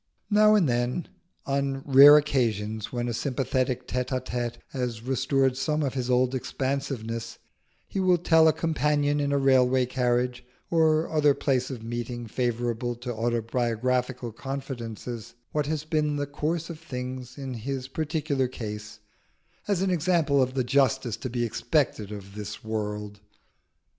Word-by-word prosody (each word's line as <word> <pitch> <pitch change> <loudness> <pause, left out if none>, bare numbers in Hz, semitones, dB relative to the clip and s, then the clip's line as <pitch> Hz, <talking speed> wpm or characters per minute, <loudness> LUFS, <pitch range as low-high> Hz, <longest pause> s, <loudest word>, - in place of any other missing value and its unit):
Now 215 +1 +6
and 190 -7 +4
then, 120 +6 -1 0.4
on 135 -1 -1
rare 140 +2 +9
occasions, 110 -7 0
when 120 -1 -2
a 120 - -2
sympathetic 130 0 -1
tête 125 0 -1
à 130 -1 -1
tête 120 -2 -3
has 125 -4 -3
restored 130 +1 +1
some 150 +3 0
of 135 - -1
his 130 -2 -2
old 125 +1 +3
expansiveness, 130 -3 -3 0.5
he 195 - -3
will 185 -2 +4
tell 160 -1 +5
a - - +7
companion 150 -2 +1
in 145 -1 0
a 140 - +2
railway 130 -1 +4
carriage, 125 0 0 0.3
or 160 -1 +3
other 150 -3 +3
place 130 -2 0
of 125 -5 -6
meeting 120 +1 -4
favourable 120 0 -1
to 120 +1 -5
autobiographical 120 +2 -1
confidences, 120 -3 -6 0.2
what 150 -1 0
has 155 -1 -2
been 155 -1 0
the 145 0 -1
course 155 +4 -2
of 160 - -9
things 130 -4 -6
in 135 -2 -5
his 130 +3 -4
particular 150 -2 -1
case, 105 -3 -7 0.7
as 195 -3 +1
an 190 - +1
example 165 -5 +2
of 130 0 0
the 130 - +1
justice 135 -2 +2
to 130 - -5
be 120 0 -1
expected 115 -3 0
of 100 -2 -8
the 105 0 -6
world. 105 -1 -4
130 Hz, 150 wpm, -27 LUFS, 120-145 Hz, 0.7 s, rare